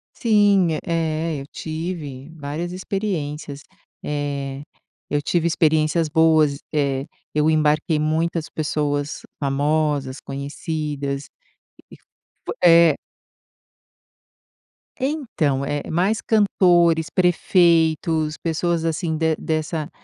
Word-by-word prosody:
Sim, 200 -7 +3
eh, 160 -2 -1
eu 135 - -10
tive 155 -4 -6
várias 155 +3 -4
experiências. 160 -7 -4 0.4
Eh, 140 -2 -3 0.5
eu 145 - 0
tive 170 +3 0
experiências 160 0 +2
boas, 155 -2 +3
eh, 140 -2 0 0.3
eu 150 +1 +2
embarquei 155 0 +2
muitas 160 +1 0
pessoas 145 -1 -2 0.2
famosas, 145 -1 0
conhecidas 140 0 -4 0.6
e - - -11
f - - -27 0.6
é. 170 -3 +7 2.0
Então, 225 - -1
é 145 0 -3
mais 190 +7 +1
cantores, 175 -6 +3
prefeitos, 165 -3 +2
pessoas, 165 0 0
assim, 160 0 -1
de 160 0 +1
dessa 155 0 -2
155 Hz, 90 wpm, -22 LUFS, 145-170 Hz, 2.0 s, é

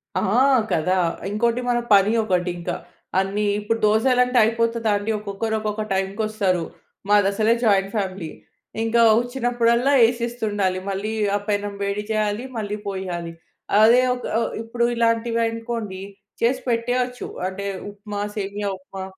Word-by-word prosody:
ఆ! - - +2 0.5
కదా! 180 +3 +1 0.3
ఇంకోటి 235 +4 0
మన 240 0 +2
పని 200 +2 +5
ఒకటి 180 -3 0
ఇంకా. 175 0 -3 0.4
అన్నీ 195 +2 -1 0.2
ఇప్పుడు 225 +2 -1
దోసలంటే 250 +3 +3
అయిపోతదాండి. 225 -2 0
ఒక్కొక్కరు 210 +2 -3
ఒక్కొక్క 215 0 -2
టైంకొస్తారు. 195 -1 0 0.5
మాదసలే 205 +2 +3
జాయింట్ 195 -2 +3
ఫ్యామిలీ. 190 -5 -3 0.5
ఇంకా 230 +1 +2 0.2
వచ్చినప్పుడల్లా 245 +1 +1
ఏసిస్తుండాలి. 220 -6 -1
మళ్ళీ 200 +3 -3 0.2
ఆ - - +3
పెనం 205 0 -1
వేడి 200 +1 -2
చేయాలి, 215 +1 0
మళ్ళీ 210 -1 -3
పోయాలి. 180 -3 -4 0.5
అదే 235 +3 +7
ఒక 250 - -8 0.4
ఇప్పుడు 235 +1 -2
ఇలాంటివి 230 0 +1
అనుకోండి 225 -4 -5 0.4
చేసి 250 +3 +2
పెట్టేయచ్చు. 245 +1 -1 0.2
అంటే 195 +1 -5 0.3
ఉప్మా, 205 0 -7 0.2
సేమియా 205 0 -3
ఉప్మా. 190 +1 -8
215 Hz, 120 wpm, -22 LUFS, 195-230 Hz, 0.5 s, అదే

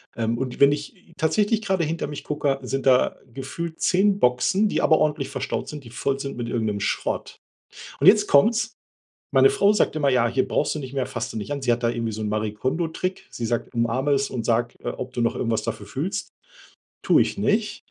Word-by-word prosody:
Ähm, 115 0 -1
und 130 +1 -4
wenn 140 0 +7
ich 145 0 -4
t 180 -2 -23
tatsächlich 210 +7 +1
gerade 190 -4 0
hinter 165 +1 -2
mich 145 0 -7
gucke, 145 -2 -1
sind 135 +1 -3
da 130 -1 +4 0.2
gefühlt 160 +5 -6
10 195 +2 +3
Boxen, 155 +12 +2
die - - 0
aber 155 - +4
ordentlich 150 -2 0
verstaut 135 -2 -3
sind, 150 -2 -7
die 115 - -12
voll 135 +3 -1
sind 135 -2 -6
mit 120 - -3
irgendeinem 110 -3 -1
Schrott. - - -3 0.6
Und 145 - +1
jetzt 210 0 +6
kommt's. 220 +9 +3 0.6
Meine 405 - +6
Frau 400 - +3
sagt 210 - +1
immer: 145 -2 +2
„Ja, 125 -2 +3
hier 130 +3 0
brauchst 145 - 0
du 155 - -4
nicht 130 -1 -7
mehr, 135 -2 -1
fasst - - -4
du - - -4
nicht 105 - -6
an.“ 140 -2 -3
Sie 120 - +2
hat 120 - -1
da 115 - +2
irgendwie 115 -1 -2
so 110 - -6
'n 105 - -2
Marikono-Trick. 130 - -2
Sie 115 - -4
sagt: 120 0 -2
„Umarme 120 +5 +1
es 140 0 +1
und 120 -3 -4
sage, 120 +1 +1
äh, - - -2
ob 130 0 -7
du 120 - -1
noch 115 - +1
irgendwas 115 -2 -1
dafür 100 - -5
fühlst." 150 - -3 0.8
Tue - - +5
ich - - -1
nicht. 210 +1 0
135 Hz, 220 wpm, -24 LUFS, 120-170 Hz, 0.8 s, wenn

